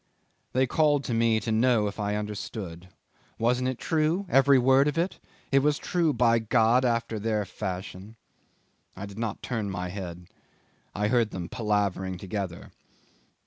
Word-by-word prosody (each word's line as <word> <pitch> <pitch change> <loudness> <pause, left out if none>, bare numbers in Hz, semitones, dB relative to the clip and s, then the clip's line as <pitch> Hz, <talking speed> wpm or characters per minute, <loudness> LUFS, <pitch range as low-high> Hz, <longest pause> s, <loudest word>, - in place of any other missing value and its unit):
They 130 +1 +3
called 145 +1 +2
to 120 - -3
me 115 -1 +3
to 110 - -3
know 115 -1 +3
if 100 +1 -4
I 105 0 -1
understood 100 -4 -6 0.5
wasn't 125 +3 +1
it 130 - -3
true, 160 +7 0
every 135 0 +5
word 135 +3 +4
of 150 - -1
it? 175 +3 -1 0.3
It 135 - +5
was 145 +1 +2
true, 170 -2 0
by 115 -2 +3
God! 115 +2 +3
after 115 -2 0
their 105 -1 -1
fashion. 95 +3 -6 0.8
I 100 - -6
did 100 +1 -10
not 115 -3 -3
turn 110 -5 -2
my 90 -1 -4
head. 90 -2 -7 0.7
I 105 +1 0
heard 115 -2 +2
them 90 -4 -6
palavering 100 -4 -1
together. 95 -2 -5
110 Hz, 155 wpm, -27 LUFS, 100-130 Hz, 0.8 s, every